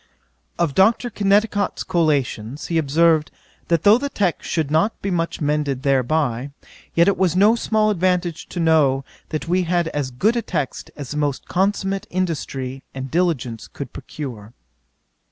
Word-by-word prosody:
'Of 170 -5 +1
Dr. 225 - +3
Kennicott's 205 0 +1
Collations, 145 -6 -1
he 165 -1 +2
observed, 160 +1 +3 0.4
that 170 -2 +1
though 210 +4 +6
the 280 +1 -2
text 195 -9 -1
should 155 -3 -1
not 165 +8 +1
be 195 - -3
much 170 -1 -1
mended 145 -3 0
thereby, 135 -1 +1 0.5
yet 170 +2 +5
it 200 - +3
was 185 -3 +2
no 205 +5 +5
small 215 -2 +1
advantage 180 -3 0
to 175 - -5
know, 150 -5 +3 0.2
that 155 +1 -4
we 180 +2 +2
had 175 -1 0
as 145 -4 -2
good 195 - +1
a 235 - +1
text 150 - -3
as 140 -4 -7
the 150 - -3
most 145 -3 -1
consummate 195 +1 0
industry 140 -7 -3
and 135 0 -5
diligence 145 -10 -1
could 140 -4 -8
procure. 120 -7 -8
165 Hz, 155 wpm, -21 LUFS, 140-190 Hz, 0.5 s, though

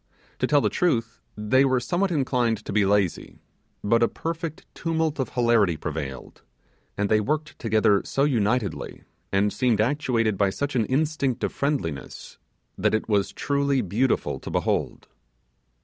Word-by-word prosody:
To - - +1
tell 145 -1 +4
the - - +2
truth 115 -10 0 0.2
they 105 +6 +3
were 130 -2 +2
somewhat 180 +9 0
inclined 125 - 0
to - - -5
be 105 -1 +3
lazy, 100 -3 0 0.5
but 115 +3 +3
a 115 - +5
perfect 165 +1 -5
tumult 160 -2 -1
of 130 - -1
hilarity 115 -8 +2
prevailed; 75 -5 -6 0.6
and 105 - +1
they 110 +1 +3
worked 150 +7 -2
together 110 -3 +3
so 135 - 0
unitedly, 120 -5 -1 0.3
and 100 +1 +2
seemed 120 -5 +1
actuated 115 -4 +1
by 100 -1 +3
such 140 +7 -3
an 115 -4 +1
instinct 140 -2 0
of - - -1
friendliness, 125 - -3 0.4
that - - +2
it 110 - -2
was 100 -3 +1
truly 140 -2 0
beautiful 110 +8 0
to - - -8
behold. - - -1
120 Hz, 150 wpm, -25 LUFS, 105-140 Hz, 0.6 s, a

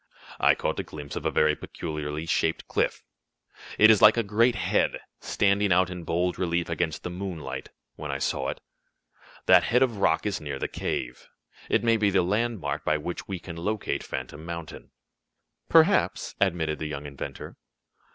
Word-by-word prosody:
I - - +5
caught - - -2
a - - -1
glimpse 75 -2 -8
of - - -2
a - - +2
very 75 0 +3
peculiarly 75 0 -5
shaped 80 0 0
cliff - - -1 0.7
it 110 +1 +8
is 110 - +4
like 105 +2 +8
a 115 - +2
great 115 +4 +3
head, - - +1 0.2
standing 100 0 +1
out 90 +1 +3
in 90 -2 -7
bold 90 +2 0
relief 85 -1 0
against 80 -1 -2
the 90 - -4
moonlight, 85 -8 -5 0.3
when 75 - -6
I 70 - -1
saw 65 - -1
it. - - -5 0.9
That - - +6
head 125 +2 +4
of 120 -5 -1
rock 80 -3 +2
is 105 -5 -2
near 70 -2 -4
the - - -2
cave. 60 +1 -4 0.4
It - - +2
may 115 -1 +4
be 105 -2 +2
the 95 -2 +3
landmark 95 -7 -1
by 75 - +2
which 85 +3 -6
we 95 - -3
can 85 -1 -9
locate 105 +5 -2
Phantom 65 +4 -6
Mountain." 85 -1 -7 0.8
"Perhaps," 165 +5 +3
admitted 80 -6 +1
the 80 - -3
young 75 -1 -6
inventor. 70 -2 -7
85 Hz, 175 wpm, -26 LUFS, 75-100 Hz, 0.9 s, it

